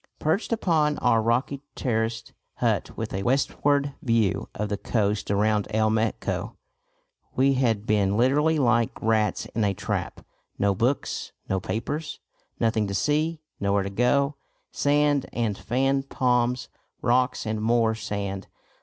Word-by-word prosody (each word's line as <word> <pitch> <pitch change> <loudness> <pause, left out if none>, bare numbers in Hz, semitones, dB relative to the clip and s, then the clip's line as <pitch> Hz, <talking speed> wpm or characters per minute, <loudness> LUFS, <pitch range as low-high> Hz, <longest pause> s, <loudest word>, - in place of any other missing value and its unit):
Perched 160 +10 0
up 230 -3 -2
on 150 -3 +3
our 115 - +3
rocky 125 +5 0
terraced 115 -2 -2 0.2
hut - - -1
with - - -4
a 95 - -2
westward 140 +3 +1
view 115 -6 +1
of 105 0 -2
the 100 - 0
coast 105 0 -1
around 105 +1 +2
El 110 0 +2
Meco, 110 0 -1 0.8
we 135 +2 +4
had 115 -6 +1
been 105 -2 +2
literally 150 +6 +3
like 120 -4 +2
rats 110 -1 +1
in 110 - 0
a 100 -1 +1
trap; - - -4 0.3
no 100 0 +2
books, 120 +8 -1
no 95 - 0
papers, 145 - -4 0.4
nothing 110 -2 +1
to 100 - -3
see, 155 +7 0 0.2
nowhere 100 0 +1
to 100 - -4
go; 140 +6 +2 0.4
sand 145 -1 +2
and 115 -4 0
fan 135 +2 +1
palms, 125 -2 0 0.4
rocks 125 +1 +2
and 110 0 -2
more 115 0 +3
sand. 100 -3 -4
115 Hz, 140 wpm, -25 LUFS, 105-135 Hz, 0.8 s, we